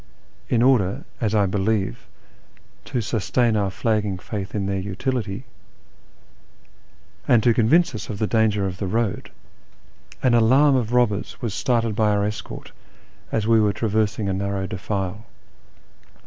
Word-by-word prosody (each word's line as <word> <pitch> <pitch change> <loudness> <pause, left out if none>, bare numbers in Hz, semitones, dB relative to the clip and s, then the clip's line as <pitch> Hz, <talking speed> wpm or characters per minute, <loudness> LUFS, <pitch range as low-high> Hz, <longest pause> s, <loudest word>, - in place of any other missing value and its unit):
In 120 -1 +3
order, 115 -8 +2
as 110 -2 0
I 105 -2 +4
believe, 95 - -1 0.8
to 125 - -2
sustain 115 +1 0
our 100 -2 +1
flagging 105 0 -1
faith 100 +1 -6
in 100 -2 -1
their 95 0 -1
utility, 105 +3 -3 1.8
and 115 -3 +4
to 120 - +4
convince 140 +10 +3
us 110 - -6
of 105 - -4
the 110 - 0
danger 105 -2 +1
of 90 -1 -4
the 100 - -2
road, 110 +1 -1 0.9
an 125 -2 +3
alarm 130 +5 +5
of 120 -3 0
robbers 120 -5 0
was 115 -6 -3
started 115 -2 0
by 110 -1 +2
our 100 -1 +1
escort 105 0 -6 0.6
as 110 -2 0
we 115 0 +4
were 105 -1 +2
traversing 110 -1 0
a 95 - 0
narrow 100 0 -2
defile. 95 +2 -4
105 Hz, 145 wpm, -23 LUFS, 100-115 Hz, 1.8 s, alarm